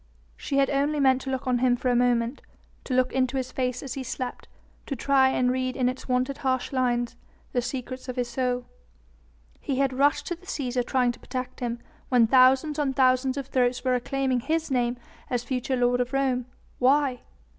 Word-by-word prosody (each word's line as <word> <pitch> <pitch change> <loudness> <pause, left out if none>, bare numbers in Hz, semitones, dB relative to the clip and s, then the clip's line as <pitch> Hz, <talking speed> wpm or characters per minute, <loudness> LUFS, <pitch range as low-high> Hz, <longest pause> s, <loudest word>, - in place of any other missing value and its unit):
She 275 - -3
had 275 -1 +3
only 285 +2 +1
meant 265 -1 +4
to 270 - -5
look 260 -1 -3
on 250 -1 +1
him 250 -1 +3
for 250 +1 -1
a - - +2
moment, 240 +1 +1 0.4
to 255 - -1
look 255 0 +2
into 260 0 +1
his 255 -1 -3
face 250 -1 -2
as 265 -3 -5
he 270 - -4
slept, 255 0 -5 0.4
to 275 - -2
try 265 +1 +3
and 250 -1 +1
read 255 0 -1
in 255 -2 +1
its 255 +1 -4
wonted 255 +2 0
harsh 260 -2 -1
lines 245 -2 0 0.4
the 245 - +1
secrets 255 +1 -5
of 250 - -4
his 245 -2 -1
soul. 250 0 -1 0.9
He 275 - -2
had 270 -1 +1
rushed 290 +2 +2
to 345 - -3
the 365 +2 -20
Cæsar 255 -6 -1
trying 250 -1 +1
to 240 - -13
protect 255 0 -5
him, 240 -1 -2 0.3
when 245 -3 +5
thousands 265 +5 +4
on 280 -2 +1
thousands 255 +1 +3
of 275 - -3
throats 250 -2 0
were 255 -1 +2
acclaiming 260 +1 0
his 315 +4 -1
name 245 -1 +1 0.3
as 245 -2 -1
future 255 +1 -2
lord 245 0 +2
of 250 +2 -3
Rome. 260 -2 0 0.3
Why? 265 0 +3
255 Hz, 200 wpm, -26 LUFS, 250-270 Hz, 0.9 s, when